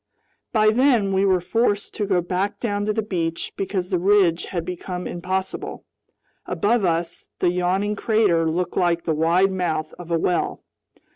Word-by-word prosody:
By 215 Hz, -1 st, +4 dB
then 235 Hz, -5 st, +3 dB
we 190 Hz, +1 st, +2 dB
were 190 Hz, -2 st, +3 dB
forced 205 Hz, +2 st, 0 dB
to 205 Hz, -, -2 dB
go 185 Hz, -3 st, +2 dB
back 190 Hz, +4 st, -2 dB
down 205 Hz, -3 st, -2 dB
to -, -, +2 dB
the 220 Hz, +1 st, -1 dB
beach 170 Hz, -5 st, -3 dB
because 190 Hz, -2 st, -2 dB
the 185 Hz, -3 st, +1 dB
ridge 185 Hz, -3 st, +3 dB
had 170 Hz, -4 st, -4 dB
become 180 Hz, 0 st, -5 dB
impossible. 185 Hz, +2 st, -4 dB, 0.6 s
Above 225 Hz, +1 st, +1 dB
us, 170 Hz, 0 st, -2 dB
the 175 Hz, -, +2 dB
yawning 185 Hz, +4 st, 0 dB
crater 200 Hz, -8 st, +2 dB
looked 175 Hz, +2 st, -2 dB
like 175 Hz, -2 st, +1 dB
the 160 Hz, -, 0 dB
wide 170 Hz, +5 st, +3 dB
mouth 165 Hz, -4 st, -2 dB
of 175 Hz, -1 st, -9 dB
a 170 Hz, -, +2 dB
well. 175 Hz, +1 st, -1 dB
185 Hz, 165 wpm, -23 LUFS, 175-205 Hz, 0.6 s, By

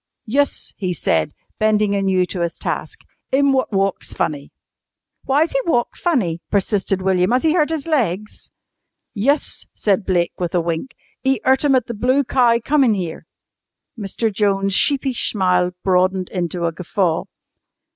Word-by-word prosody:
"Yus," 280 Hz, +5 st, 0 dB
he 185 Hz, -2 st, -2 dB
said, 80 Hz, -, 0 dB, 0.3 s
bending 215 Hz, -1 st, +2 dB
anew 190 Hz, -2 st, +2 dB
to 180 Hz, 0 st, -5 dB
his 170 Hz, -1 st, -2 dB
task, -, -, -4 dB, 0.3 s
"'im 275 Hz, +1 st, +3 dB
wot 260 Hz, -2 st, 0 dB
walks 195 Hz, -1 st, -1 dB
funny." 145 Hz, -2 st, -2 dB, 0.7 s
"Why's 295 Hz, +5 st, +2 dB
he -, -, +1 dB
walk 240 Hz, -7 st, +1 dB
funny?" 210 Hz, -, 0 dB
persisted 195 Hz, -1 st, 0 dB
William. 185 Hz, -1 st, +2 dB
"Has 250 Hz, +2 st, +2 dB
he 320 Hz, -1 st, +3 dB
hurt 310 Hz, -4 st, +2 dB
his 320 Hz, -3 st, -3 dB
legs?" 215 Hz, -, -2 dB, 0.6 s
"Yus," 275 Hz, +8 st, 0 dB
said 200 Hz, -1 st, +1 dB
Blake 175 Hz, -3 st, 0 dB
with 175 Hz, -1 st, -2 dB
a -, -, +4 dB
wink. 170 Hz, +9 st, -3 dB, 0.3 s
"'E 265 Hz, 0 st, +2 dB
'urt 265 Hz, +3 st, +3 dB
'em 275 Hz, -2 st, +4 dB
at 250 Hz, -3 st, +2 dB
the 235 Hz, -, -5 dB
Blue 255 Hz, +6 st, +2 dB
Cow 245 Hz, -3 st, +3 dB
comin' 275 Hz, -7 st, +3 dB
'ere." 175 Hz, -4 st, -5 dB, 0.7 s
Mr. 220 Hz, 0 st, -2 dB
Jones' 195 Hz, -1 st, +1 dB
sheepish 270 Hz, +2 st, +2 dB
smile 180 Hz, -3 st, +2 dB
broadened 185 Hz, 0 st, +1 dB
into 175 Hz, -1 st, -2 dB
a 165 Hz, -, 0 dB
guffaw. 175 Hz, 0 st, -1 dB
205 Hz, 155 wpm, -20 LUFS, 180-260 Hz, 0.7 s, a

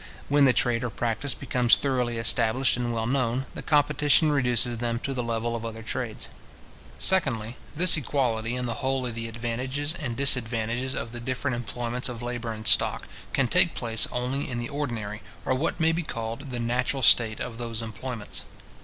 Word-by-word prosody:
When 145 Hz, 0 st, +5 dB
the 130 Hz, -, +6 dB
trade 120 Hz, -1 st, +1 dB
or 125 Hz, -, -1 dB
practice 120 Hz, +5 st, 0 dB
becomes 125 Hz, -3 st, +3 dB
thoroughly 125 Hz, -4 st, -1 dB
established 115 Hz, +3 st, +3 dB
and 120 Hz, -1 st, -2 dB
well 115 Hz, -1 st, -2 dB
known, 130 Hz, 0 st, 0 dB
the -, -, -6 dB
competition 150 Hz, 0 st, +3 dB
reduces 125 Hz, -3 st, +2 dB
them 115 Hz, 0 st, -1 dB
to 135 Hz, -, -3 dB
the 125 Hz, -, -2 dB
level 115 Hz, 0 st, -2 dB
of 115 Hz, -, -5 dB
other 115 Hz, 0 st, -6 dB
trades. -, -, -3 dB, 0.7 s
Secondly, 125 Hz, -, +2 dB, 0.2 s
this 180 Hz, +3 st, +6 dB
equality 120 Hz, -5 st, -1 dB
in 125 Hz, 0 st, -2 dB
the 120 Hz, -, -1 dB
whole 135 Hz, -1 st, 0 dB
of 120 Hz, -, -3 dB
the 115 Hz, 0 st, -4 dB
advantages 125 Hz, +6 st, -3 dB
and 130 Hz, -9 st, -5 dB
disadvantages 125 Hz, -1 st, +2 dB
of 115 Hz, -, -4 dB
the 120 Hz, -, -6 dB
different 130 Hz, +2 st, -2 dB
employments 120 Hz, +2 st, -3 dB
of 120 Hz, -1 st, -7 dB
labour 120 Hz, -1 st, -4 dB
and 110 Hz, -1 st, -5 dB
stock, -, -, +4 dB, 0.2 s
can 135 Hz, -2 st, +1 dB
take 180 Hz, +4 st, +3 dB
place 115 Hz, -2 st, 0 dB
only 125 Hz, +3 st, -2 dB
in 125 Hz, -, -3 dB
the 120 Hz, 0 st, -4 dB
ordinary, 115 Hz, -8 st, -4 dB, 0.2 s
or -, -, +1 dB
what 145 Hz, +6 st, -1 dB
may 160 Hz, 0 st, +3 dB
be 165 Hz, +1 st, -1 dB
called 115 Hz, -1 st, -6 dB
the 125 Hz, -1 st, -4 dB
natural 125 Hz, +3 st, -1 dB
state 110 Hz, 0 st, +5 dB
of 115 Hz, -1 st, -6 dB
those 115 Hz, -1 st, -4 dB
employments. 110 Hz, 0 st, -5 dB
120 Hz, 185 wpm, -26 LUFS, 115-135 Hz, 0.7 s, the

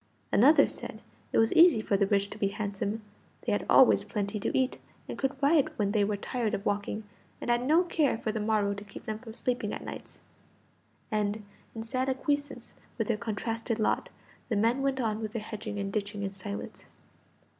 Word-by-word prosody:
Another 285 Hz, +9 st, +7 dB
said -, -, -8 dB, 0.3 s
it -, -, +1 dB
was 225 Hz, 0 st, +4 dB
easy 335 Hz, -7 st, +7 dB
for 215 Hz, -1 st, 0 dB
the 200 Hz, 0 st, +3 dB
rich 200 Hz, 0 st, +1 dB
to 210 Hz, -, -8 dB
be 200 Hz, -, +2 dB
handsome; 200 Hz, +1 st, -3 dB, 0.4 s
they -, -, +1 dB
had -, -, 0 dB
always -, -, +7 dB
plenty 210 Hz, -1 st, -3 dB
to -, -, -1 dB
eat, 260 Hz, 0 st, +1 dB, 0.3 s
and -, -, -5 dB
could 270 Hz, +1 st, -1 dB
ride 290 Hz, 0 st, +4 dB
when 200 Hz, -2 st, +1 dB
they 210 Hz, -1 st, +3 dB
were 205 Hz, 0 st, 0 dB
tired 225 Hz, +1 st, -1 dB
of 200 Hz, -, -6 dB
walking, 205 Hz, +1 st, -1 dB, 0.4 s
and 240 Hz, -, -1 dB
had 240 Hz, +1 st, +2 dB
no 315 Hz, +7 st, +4 dB
care 310 Hz, -8 st, +1 dB
for 220 Hz, -, -2 dB
the 220 Hz, -, -3 dB
morrow 210 Hz, -1 st, +1 dB
to 200 Hz, 0 st, -7 dB
keep 205 Hz, -, -11 dB
them 215 Hz, 0 st, -4 dB
from 225 Hz, -2 st, -10 dB
sleeping 250 Hz, 0 st, -1 dB
at -, -, -5 dB
nights. -, -, -8 dB, 0.9 s
And, 210 Hz, 0 st, -1 dB, 0.3 s
in 225 Hz, -, -4 dB
sad 255 Hz, +3 st, -1 dB
acquiescence 285 Hz, +2 st, -2 dB, 0.2 s
with -, -, -1 dB
their 230 Hz, -, +3 dB
contrasted 225 Hz, +1 st, -2 dB
lot, 215 Hz, -, 0 dB, 0.4 s
the 225 Hz, -, +1 dB
men 230 Hz, +6 st, +2 dB
went 270 Hz, -1 st, 0 dB
on 220 Hz, -3 st, -1 dB
with 215 Hz, -1 st, -4 dB
their 230 Hz, -3 st, -3 dB
hedging 215 Hz, -1 st, -6 dB
and 200 Hz, -1 st, -3 dB
ditching 205 Hz, -1 st, -2 dB
in 195 Hz, -, -2 dB
silence. 200 Hz, +1 st, -7 dB
220 Hz, 200 wpm, -29 LUFS, 205-250 Hz, 0.9 s, Another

